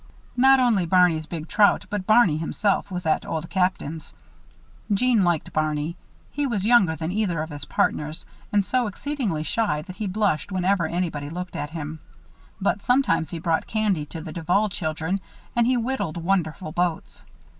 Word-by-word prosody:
Not 265 +2 +6
only 220 -8 +2
Barney's 170 -3 +3
big 160 -1 -6
trout 205 +2 +3
but 205 -2 -3
Barney 215 -8 +5
himself 195 +6 0
was 180 -2 -5
at 155 - +1
Old 160 +1 -4
Captain's. 180 -4 -1 0.8
Jeanne 225 +1 +3
liked 175 -3 0
Barney. 155 +1 -1 0.4
He 290 -1 0
was 205 -6 -1
younger 215 -8 +5
than 160 +1 -3
either 190 -5 0
of 155 +1 -4
his 145 -1 -6
partners 150 +2 -1 0.3
and 205 -2 +2
so 250 0 +1
exceedingly 210 - -3
shy 160 -3 0
that 185 +1 -10
he 215 -2 -2
blushed 200 -3 0
whenever 185 -2 +1
anybody 160 -4 -2
looked 180 +3 -6
at 145 - -3
him. 160 -1 -6 0.6
But 200 - +1
he - - -23
sometimes 245 - +2
brought 165 -1 -1
candy 205 -9 0
to 165 +2 -7
the 160 -1 -7
Duval 180 +6 +1
children 165 +1 -2 0.3
and 240 -1 +3
he 255 0 +3
whittled 235 -9 -2
wonderful 170 -1 -1
boats. 175 0 -2
180 Hz, 165 wpm, -24 LUFS, 160-210 Hz, 0.8 s, Not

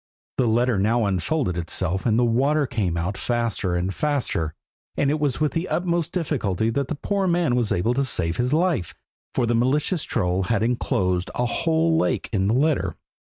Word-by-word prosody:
The 125 - +3
letter 120 -1 +2
now 110 +3 +2
unfolded 100 - 0
itself 90 +3 -1
and 110 -1 +3
the 120 - +3
water 140 +6 +2
came 100 -10 -1
out 90 +4 -2
faster 115 -6 -1
and 90 +2 -1
faster, 125 - -1 0.4
and 140 0 +2
it 155 - 0
was 145 -4 0
with 150 -1 +1
the 165 +2 -2
utmost 170 -2 0
difficulty 115 - -1
the 140 +4 0
poor 200 -2 0
man 170 -7 +2
was 120 -4 0
able 100 +5 +1
to 140 +2 +1
save 90 -10 -1
his 125 +1 0
life, 155 - +1 0.4
for 125 - +2
the 120 - +1
malicious 145 +8 +1
troll 90 +1 0
had 110 +1 +1
enclosed 95 -6 0
a 125 - 0
whole 165 +5 +1
lake - - 0
in 95 -2 +1
the 110 - +2
letter. 150 +2 +1
120 Hz, 185 wpm, -23 LUFS, 95-150 Hz, 0.4 s, The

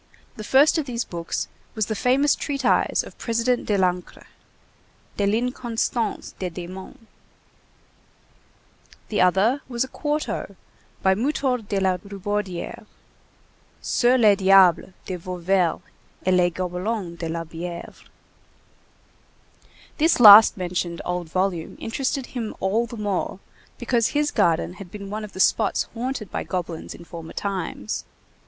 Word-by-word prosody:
The 215 - -7
first 280 +8 +4
of 290 - -3
these 240 -2 -2
books 170 -1 -4 0.3
was 215 -2 0
the 220 - -3
famous 260 +6 +3
treatise 275 -3 +1
of - - -13
President 235 +1 0
Delancre, 180 -3 -1 0.9
De 200 - +1
l'Inconstance 235 0 -1
des 185 - -2
Démons; 180 +2 -9 2.1
the 210 - +1
other 195 +9 +3
was 240 0 0
a - - -5
quarto 295 +3 -3 0.5
by 190 0 +5
Mutor 255 +3 0
de 205 -2 -3
la 190 -1 +1
Rubaudière, 200 -1 -5 0.9
Sur 245 +1 +2
les 215 -4 +6
Diables 190 -2 +5
de 185 - -4
Vauvert 180 0 0 0.4
et 185 - +3
les 180 -1 +4
Gobelins 180 +2 -3
de 165 - -3
la 165 +1 -3
Bièvre. 170 +1 -8 1.9
This 320 -1 +3
last 215 -2 +10
mentioned 175 -2 -3
old 180 -2 -3
volume 185 -2 -2
interested 260 +3 -2
him 235 -5 -5
all 220 +5 +1
the 235 - -8
more, 205 -3 -2 0.4
because 240 -1 +1
his 295 0 0
garden 170 -4 +1
had 185 - -9
been 200 +1 -8
one 215 +1 -4
of 210 - -9
the - - -9
spots 205 +2 +3
haunted 240 -2 -4
by - - -3
goblins 175 -3 -5
in 170 - -13
former 165 -1 -9
times. 190 - -3
200 Hz, 130 wpm, -23 LUFS, 180-235 Hz, 2.1 s, last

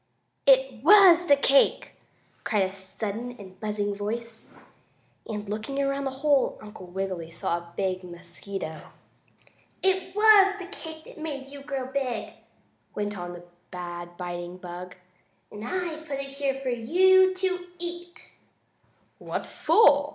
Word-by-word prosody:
"It 265 -3 +4
was 355 -1 +8
the 285 - +7
cake!" 275 0 +3 0.5
cried 210 -4 +2
a 190 - -2
sudden 210 +5 -6
and 190 -2 -13
buzzing 210 -1 -2
voice, 225 +3 -5 0.8
and, 210 -1 -4
looking 220 +7 -4
around 275 0 0
the - - 0 0.2
hole 285 -3 +3
Uncle 210 -3 -11
Wiggily 185 -2 -4
saw 170 +1 -1
a 170 0 -16
big 185 -1 -1
mosquito. 175 -1 -6 1.0
"It 375 0 +1
was 415 -2 +7
the 380 - -7
cake 320 -5 -9
that - - -13
made 280 -4 -5
you 285 0 -9
grow 275 -2 -4
big," 260 -3 -3 0.6
went 205 0 -2
on 175 -2 -6
the 175 0 -10 0.3
bad 175 -1 -7
biting 175 0 -5
bug, 180 0 -8 0.6
"and 210 0 -8
I 345 +4 -2
put 300 -3 -6
it 275 0 -5
here 275 -1 -1
for 270 -1 -4
you 375 +10 +4
to 370 -1 -1
eat." 345 0 -5 0.9
"What - - -4
for?" 290 -9 +4
245 Hz, 140 wpm, -26 LUFS, 190-315 Hz, 1.0 s, was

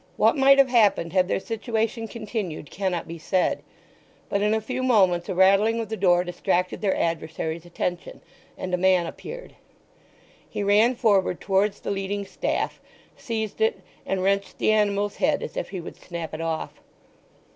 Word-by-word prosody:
What - - +4
might 275 0 +6
have 275 -1 +5
happened 205 -8 +3
had 185 -1 +3
their - - 0
situation 225 +1 -2
continued 210 - -5
cannot 185 -3 -2
be 165 0 -7
said; 185 +3 0 0.7
but 200 - 0
in 210 +1 +2
a - - +1
few 255 +4 -4
moments 190 -8 +3
a 190 - -2
rattling 200 +5 +4
of 225 -2 -4
the 220 - -2
door 180 -4 +3
distracted 180 0 -1
their 200 -3 +1
adversary's 165 0 -3
attention, 175 - -4 0.4
and 185 - -5
a - - +3
man 185 -1 +3
appeared. - - -8 1.0
He 205 - -3
ran 215 +5 +4
forward 200 -7 +2
towards 200 +1 +1
the - - -3
leading 200 +1 -3
staff, - - -2 0.3
seized 220 - -4
it, 450 +2 +1 0.2
and 190 -1 -2
wrenched 200 +1 0
the - - +2
animal's 205 -1 +1
head 290 0 +1
as - - -7
if - - -3
he 190 - -5
would 170 - -9
snap 170 -3 -7
it 155 - -4
off. 165 -1 -4
200 Hz, 170 wpm, -25 LUFS, 180-220 Hz, 1.0 s, might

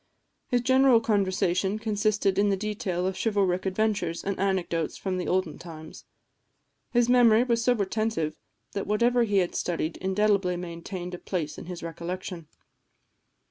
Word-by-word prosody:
His 245 -2 +1
general 260 -1 +5
conversation 195 -2 +1
consisted 215 -2 0
in 205 0 +3
the 195 - +1
detail 205 -3 -2
of 190 0 -1
chivalric 190 -2 0
adventures 190 -4 -1
and 195 -1 -3
anecdotes 180 -4 -1
of 185 -1 0
the 180 - -3
olden 185 -4 0
times. 160 -2 -10 0.8
His 240 -1 +2
memory 240 -2 +6
was 235 -2 +1
so 250 - +4
retentive 205 -6 -1 0.4
that 200 - -4
whatever 235 +3 +3
he 205 -2 +1
had 180 -2 +1
studied 165 -2 -2
indelibly 190 -1 +1
maintained 175 +1 -6
a 180 - -6
place 165 -6 -4
in - - -10
his 180 -2 -7
recollection. 170 0 -6
195 Hz, 145 wpm, -27 LUFS, 180-215 Hz, 0.8 s, memory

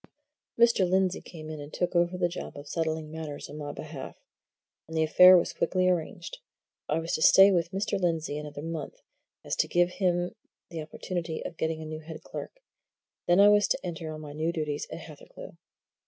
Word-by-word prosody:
Mr. 230 -6 +4
Lindsey 190 0 +1
came 155 -3 -10
in 155 - -6
and 145 +1 -9
took 180 +1 -2
over 175 +1 +2
the 180 -1 +2
job 175 -3 -7
of 145 +1 -9
settling 160 -1 -2
matters 155 -2 -6
on 150 - -8
my 145 -1 -5
behalf. 150 -3 -8 0.7
And 160 0 -5
the 160 - +3
affair 180 +4 +8
was 170 - 0
quickly 185 -1 +1
arranged. 170 -1 -2 0.5
I 150 - +1
was 165 +1 -3
to - - -1
stay 195 +4 +8
with 170 -3 +1
Mr. 195 +2 -2
Lindsey 165 -4 0
another 150 -1 -7
month, 165 -3 -5
so - - -30 0.4
as - - -1
to - - +2
give 175 0 +3
him 180 -2 0 0.4
the 165 -2 -4
opportunity 165 +1 -5
of 170 - -6
getting 160 0 -2
a - - -8
new 155 0 -6
head 160 0 -10
clerk, - - -8 0.7
then 175 +2 +4
I 205 +1 +8
was 205 -1 +5
to - - -1
enter 165 -2 -5
on 155 0 -7
my 145 -1 -8
new 160 +2 -1
duties 150 -3 -3
at - - -6
Hathercleugh. - - -12
165 Hz, 200 wpm, -28 LUFS, 155-180 Hz, 0.7 s, affair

